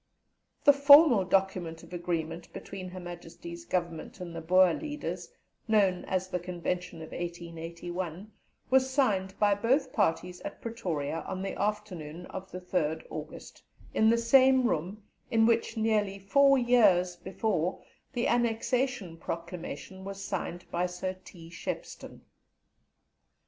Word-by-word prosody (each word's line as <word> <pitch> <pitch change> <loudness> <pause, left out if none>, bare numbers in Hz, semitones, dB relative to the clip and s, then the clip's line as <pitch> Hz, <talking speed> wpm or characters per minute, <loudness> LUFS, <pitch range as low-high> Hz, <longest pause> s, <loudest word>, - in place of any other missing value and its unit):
The 285 - +8
formal 280 - +8
document 185 -3 0
of - - -13
agreement 170 -1 -3
between 185 -2 -7
Her 185 +1 -8
Majesty's 170 -1 -9
Government 170 -1 -3
and 175 -2 -7
the 165 - -4
Boer 185 +1 +5
leaders, 300 -1 -5 0.4
known 200 -5 +3
as 185 0 -1
the 180 -1 -2
Convention 175 -1 -4
of 160 - -10
1881, 170 +2 -6 0.4
was 265 0 +4
signed 205 -9 +1
by 205 -1 +4
both 255 +6 +1
parties 180 -3 0
at - - -7
Pretoria 165 -10 -3
on 190 0 -4
the 195 - -3
afternoon 185 -6 -3
of 190 0 -7
the 180 - -6
3rd 160 -4 -1
August, 155 0 -8 0.3
in 220 - +4
the 230 - +4
same 260 +2 +5
room 190 +4 -2 0.3
in 225 -1 +4
which, 230 0 +1
nearly 210 -3 +1
four 275 +8 +4
years 205 -8 +4
before, 180 -1 -2 0.3
the 240 - 0
Annexation 240 -4 0
Proclamation 170 +3 -6
was 195 0 -6
signed 175 - -4
by 175 +1 0
Sir 180 +1 -4
T. 165 -2 -13
Shepstone. 170 - -6
185 Hz, 135 wpm, -29 LUFS, 170-220 Hz, 0.4 s, The